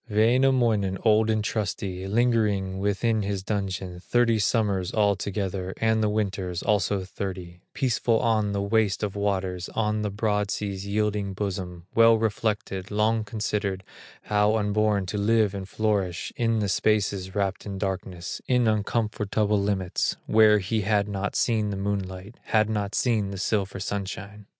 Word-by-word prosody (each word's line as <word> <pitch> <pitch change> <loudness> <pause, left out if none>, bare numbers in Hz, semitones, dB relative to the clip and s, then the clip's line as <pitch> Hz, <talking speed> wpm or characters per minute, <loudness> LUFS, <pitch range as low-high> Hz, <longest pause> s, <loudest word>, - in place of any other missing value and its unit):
Wainamoinen, 115 -3 +3
old 110 0 +4
and 110 -1 +1
trusty, 95 -3 -3
Lingering 105 -4 +1
within 105 +3 +1
his 100 -1 -3
dungeon 95 -3 -3
Thirty 115 +3 +2
summers 100 -4 +1
altogether, 100 -2 -1
And 110 -1 +2
of 105 - +2
winters, 95 -4 -2
also 105 -2 +1
thirty, 90 -2 -6
Peaceful 120 -3 +1
on 110 -3 +1
the 100 0 -1
waste 110 -1 +1
of 100 -1 -2
waters, 95 -3 -2
On 105 -1 0
the 105 - -1
broad 105 0 0
sea's 100 -2 -3
yielding 105 -1 -1
bosom, 90 -3 -4
Well 115 0 +6
reflected, 105 -3 -2
long 110 +1 +1
considered, 105 -2 -2 0.4
How 105 +1 +2
unborn 105 -1 +1
to 100 +3 -3
live 110 -1 +3
and 95 -1 -6
flourish 100 -5 -1
In 115 -1 +1
the 105 - 0
spaces 100 -2 0
wrapped 100 0 -1
in 100 -1 -5
darkness, 95 -2 -4
In 125 -2 +3
uncomfortable 105 -1 0
limits, 100 -3 0
Where 110 -1 +6
he 105 +3 -1
had 100 0 +1
not 100 0 -3
seen 110 -3 +1
the 100 - -3
moonlight, 100 +1 -4
Had 110 0 +2
not 105 -1 -2
seen 110 -5 +1
the 100 - -6
silver 100 0 -1
sunshine. 100 +1 -5
105 Hz, 145 wpm, -26 LUFS, 95-110 Hz, 0.4 s, Well